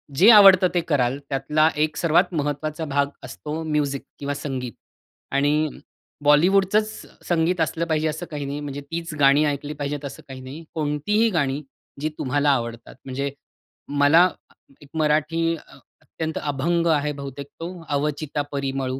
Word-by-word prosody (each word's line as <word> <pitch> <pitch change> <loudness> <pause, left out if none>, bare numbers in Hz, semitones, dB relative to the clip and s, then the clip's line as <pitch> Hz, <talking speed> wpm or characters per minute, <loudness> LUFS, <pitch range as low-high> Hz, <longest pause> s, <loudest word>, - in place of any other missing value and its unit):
जे 190 +10 +7
आवडतं 195 -4 +8
ते 175 - +2
कराल, 135 -4 +1
त्यातला 150 +3 +2
एक 150 0 0
सर्वात 175 +2 +2
महत्त्वाचा 150 +1 -2
भाग 140 -1 +1 0.2
असतो 155 +2 -6
म्युझिक 150 -3 -1 0.2
किंवा 145 0 -2
संगीत. 135 -4 -4 0.6
आणि 145 +3 +2 0.5
बॉलिवूडचच 190 +8 +4 0.4
संगीत 170 0 +1
असलं 160 +2 0
पाहिजे 160 -1 0
असं 155 +3 -3
काही 145 -2 -4
नाही. 140 +1 -4
म्हणजे 145 -1 -5
तीच 165 +3 -5
गाणी 140 +1 +5
ऐकली 145 0 -2
पाहिजेत 145 0 -4
असं 140 -1 -8
काही 130 -1 -9
नाही. 135 +6 -9
कोणतीही 160 +9 +1
गाणी 145 -6 0 0.4
जी 155 - 0
तुम्हाला 145 +2 +1
आवडतात 115 -3 -3
म्हणजे, 140 +1 -3 0.6
मला 145 +5 +5 0.5
एक 145 - -15
मराठी 155 +2 +1 0.5
अत्यंत 160 - -5
अभंग 160 +4 0
आहे 150 -2 +2
बहुतेक 140 0 -7
तो 165 +1 -4 0.2
'अवचिता 145 0 -1
परिमळू'. 135 -1 -2
150 Hz, 140 wpm, -23 LUFS, 140-160 Hz, 0.6 s, आवडतं